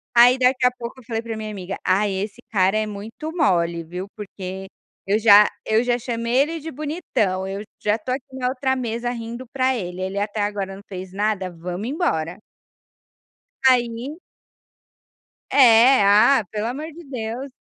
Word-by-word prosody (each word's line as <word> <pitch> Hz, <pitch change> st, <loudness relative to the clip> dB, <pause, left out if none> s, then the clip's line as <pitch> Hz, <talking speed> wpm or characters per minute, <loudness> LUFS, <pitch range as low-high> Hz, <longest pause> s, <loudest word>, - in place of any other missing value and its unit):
Aí, 245 Hz, +2 st, +7 dB
daqui 255 Hz, 0 st, +3 dB
a 250 Hz, -, +5 dB
pouco, 245 Hz, +1 st, -8 dB
eu -, -, -20 dB
falei 225 Hz, -1 st, -3 dB
para 230 Hz, -1 st, -5 dB
minha 215 Hz, 0 st, -5 dB
amiga: 195 Hz, -1 st, -5 dB
"Ai, 195 Hz, +1 st, +2 dB
esse 205 Hz, +5 st, -4 dB
cara 195 Hz, -1 st, +2 dB
é 215 Hz, -, +1 dB
muito 220 Hz, +10 st, -7 dB
mole 170 Hz, -, +1 dB
viu, 180 Hz, +4 st, -6 dB
porque 190 Hz, -2 st, -7 dB, 0.4 s
eu 205 Hz, +2 st, +2 dB
já 210 Hz, -1 st, +7 dB, 0.2 s
eu 220 Hz, +2 st, +2 dB
já 245 Hz, 0 st, +1 dB
chamei 235 Hz, 0 st, -2 dB
ele 325 Hz, +3 st, -4 dB
de 320 Hz, +2 st, -6 dB
bonitão, 260 Hz, -, -2 dB
eu 195 Hz, +1 st, -4 dB, 0.2 s
já 210 Hz, 0 st, +3 dB
estou 230 Hz, +3 st, -4 dB
aqui 265 Hz, 0 st, -11 dB
na 250 Hz, -1 st, -1 dB
outra 265 Hz, +1 st, 0 dB
mesa 235 Hz, -1 st, -2 dB
rindo 235 Hz, +1 st, -6 dB
para 260 Hz, -1 st, +1 dB
ele, 180 Hz, -5 st, -5 dB
ele 190 Hz, +1 st, -3 dB
até 205 Hz, +1 st, -2 dB
agora 200 Hz, -2 st, -2 dB
não 200 Hz, -, -13 dB
fez 185 Hz, -1 st, -7 dB
nada. 200 Hz, -2 st, -1 dB
Vamos 180 Hz, +6 st, -5 dB
embora". 175 Hz, -, -1 dB, 1.3 s
Aí 245 Hz, +4 st, +1 dB, 1.3 s
É, 250 Hz, -1 st, +7 dB
ah, 210 Hz, +5 st, +5 dB
pelo 210 Hz, +1 st, -2 dB
amor 300 Hz, +7 st, -5 dB
de 340 Hz, +3 st, -12 dB
Deus. 255 Hz, -1 st, -5 dB
225 Hz, 170 wpm, -22 LUFS, 195-255 Hz, 1.3 s, Aí